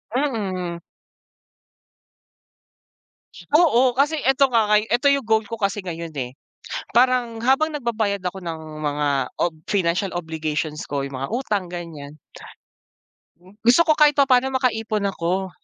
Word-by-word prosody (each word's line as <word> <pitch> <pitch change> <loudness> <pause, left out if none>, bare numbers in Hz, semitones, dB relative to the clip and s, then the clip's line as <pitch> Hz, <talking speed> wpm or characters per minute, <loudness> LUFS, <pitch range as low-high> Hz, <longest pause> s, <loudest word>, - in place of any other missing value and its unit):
Mm. 195 -11 -2 2.7
Oo, 280 -5 +5
kasi 295 +3 +2
ito 270 +1 +4
ka 235 -3 +3
kay, 210 0 +5
ito 245 +4 +2
yung 275 -3 0
goal 220 0 +3
ko 230 - -5
kasi 200 -1 -1
ngayon, 165 -2 -6
eh. 125 -3 -4 0.6
Parang 245 -2 +3
habang 270 +5 +3
nagbabayad 225 -8 -2
ako 190 +2 -4
ng 165 -2 -5 0.2
mga 150 0 -1 0.3
ob 175 - 0 0.2
financial 190 0 0
obligations 155 -2 -3
ko. 140 -1 -2
Yung 140 - -8
mga 135 - -4
utang, 210 -6 -2
ganyan. 160 -4 -8 1.2
Hmm, 185 +3 -19
gusto 250 +9 +5
ko 310 - +6
kahit 300 -1 +4
papaano 265 -1 +4
makaipon 225 -5 0
ako. 185 0 -2
210 Hz, 130 wpm, -22 LUFS, 170-255 Hz, 2.7 s, ko